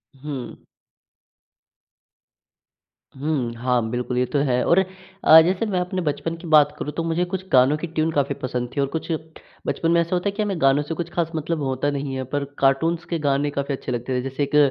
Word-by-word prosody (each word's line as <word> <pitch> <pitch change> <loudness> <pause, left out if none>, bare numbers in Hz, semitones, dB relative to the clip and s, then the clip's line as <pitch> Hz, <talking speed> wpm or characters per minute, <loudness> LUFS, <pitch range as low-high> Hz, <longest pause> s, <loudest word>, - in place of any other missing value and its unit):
हुँ। 135 -3 -6 2.6
हुँ, 135 -4 -1
हाँ। 120 -1 0
बिल्कुल, 125 +1 -2
ये 125 - +3
तो 145 - -1
है 125 0 +2
और 175 - +5 0.4
अ, 160 +1 +9
जैसे 185 +6 +1
मैं 195 -4 0
अपने 180 +1 -2
बचपन 165 +1 -2
की 170 0 -10
बात 155 -2 +5
करूँ 150 - -3
तो 165 - -2
मुझे 165 +2 0
कुछ 185 +1 -5
गानों 130 +3 +5
की 170 +3 -5
ट्यून 160 0 0
काफ़ी 140 -2 0
पसंद 125 -1 -2
थी 140 - +1
और 140 - +1
कुछ 160 +1 -3 0.6
बचपन 165 - 0
में 170 - +4
ऐसा 170 +2 -1
होता 180 +3 0
है - - -3
कि 215 - 0
हमें 195 -5 -2
गानों 135 +2 +4
से 155 - -4
कुछ 170 0 -4
ख़ास 165 -2 -1
मतलब 155 0 -2
होता 135 +1 0
नहीं 140 -1 -3
है, 130 - -2
पर 140 +2 -2 0.2
कार्टून्स 160 +5 +2
के 170 - -1
गाने 145 0 +1
काफ़ी 140 0 -2
अच्छे 130 - -6
लगते 125 +1 -2
थे। 125 - 0
जैसे 135 +2 -3
एक 140 +1 -2
145 Hz, 210 wpm, -23 LUFS, 130-165 Hz, 2.6 s, अ